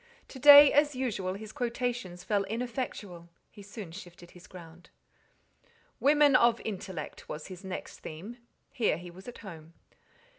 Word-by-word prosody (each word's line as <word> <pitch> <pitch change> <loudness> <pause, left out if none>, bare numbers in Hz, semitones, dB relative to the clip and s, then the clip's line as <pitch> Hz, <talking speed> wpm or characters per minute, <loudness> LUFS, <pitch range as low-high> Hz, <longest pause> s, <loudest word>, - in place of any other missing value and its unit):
To 265 - -10
day, 290 +1 +9
as 290 -1 +3
usual, 200 -8 -3
his 215 +1 -9
quotations 235 -7 -4
fell 205 0 0
ineffectual: 220 -6 -5 0.2
he 205 - -14
soon 200 -3 -9
shifted 175 -1 -12
his 180 0 -16
ground. 170 -2 -14 1.1
"Women 290 -1 +4
of 235 -2 +4
intellect" 190 -6 -7
was 150 +4 -7
his 185 0 -10
next 190 -1 -7
theme: 185 +10 -9 0.3
here 220 -10 0
he 175 0 -10
was 185 +5 -14
at 245 - -9
home. 165 -3 -11
200 Hz, 145 wpm, -29 LUFS, 175-245 Hz, 1.1 s, day